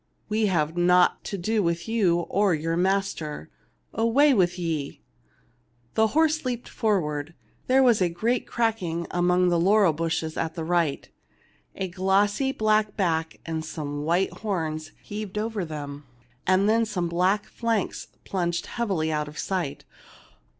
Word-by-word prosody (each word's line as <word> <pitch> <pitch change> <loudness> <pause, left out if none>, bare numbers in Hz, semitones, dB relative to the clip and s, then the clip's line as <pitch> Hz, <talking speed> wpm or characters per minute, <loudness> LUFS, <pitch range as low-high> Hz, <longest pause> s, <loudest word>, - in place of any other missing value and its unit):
We 215 0 +2
have 160 -4 0
naught 180 +1 +3
to 200 - -3
do 215 +4 0
with 170 0 -1
you 195 -7 +2
or 195 +1 +1
your 165 +2 -2
master. 180 - -1 0.4
Away 260 +6 +4
with 180 -5 +2
ye 160 -5 -3 0.5
!" 120 0 -40
The 220 0 +3
horse 315 -1 +3
leaped 245 -2 -3
forward. 160 -8 -1 0.3
There 265 +1 +5
was 235 -5 +4
a 180 - +3
great 225 +9 -1
cracking 190 -8 -1
among 180 +1 +3
the 170 -1 +2
laurel 195 -1 +4
bushes 160 0 -2
at 165 0 -2
the 165 - -4
right, 165 -3 0 0.7
a 190 - -2
glossy 195 +8 +1
black 215 -3 +1
back 165 -4 -1
and 160 -1 -3
some 145 -2 -5
white 170 +5 +1
horns 160 -7 -3
heaved 210 -1 -6
over 215 -2 -2
them, 145 -3 -7 0.4
then 200 +5 +4
some 180 -5 -2
black 185 +5 +1
flanks 230 -4 -2 0.2
plunged 175 -2 -1
heav 235 -2 -3
ily 160 -4 0
out 150 -1 -1
of 150 - -10
sight. 180 -7 -3
180 Hz, 150 wpm, -25 LUFS, 160-210 Hz, 0.7 s, There